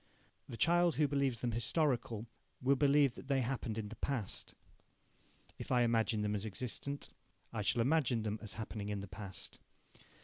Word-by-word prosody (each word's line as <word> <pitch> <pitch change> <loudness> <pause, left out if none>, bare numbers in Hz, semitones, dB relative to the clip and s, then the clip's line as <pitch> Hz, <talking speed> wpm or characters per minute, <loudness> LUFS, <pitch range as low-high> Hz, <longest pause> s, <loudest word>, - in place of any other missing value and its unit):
The 115 - -6
child 175 +2 +4
who 150 -1 +3
believes 140 -4 0
them 120 - 0
historical 120 -2 0 0.3
will 135 +2 +4
believe 140 -1 +4
that 135 - -10
they 135 -2 +2
happened 120 -3 -2
in 105 -2 -3
the 115 - -8
past. 125 -8 -3 1.0
If - - -6
I 125 -1 +5
imagine 115 -2 +2
them 105 0 0
as 105 -1 -1
existent, 125 +6 -3 0.4
I 110 - -1
shall 110 +3 +2
imagine 130 -5 +2
them 105 0 -2
as 105 -4 -5
happening 105 0 -5
in 100 -1 -2
the 100 - -6
past. 95 -1 -7
120 Hz, 170 wpm, -35 LUFS, 110-140 Hz, 1.0 s, I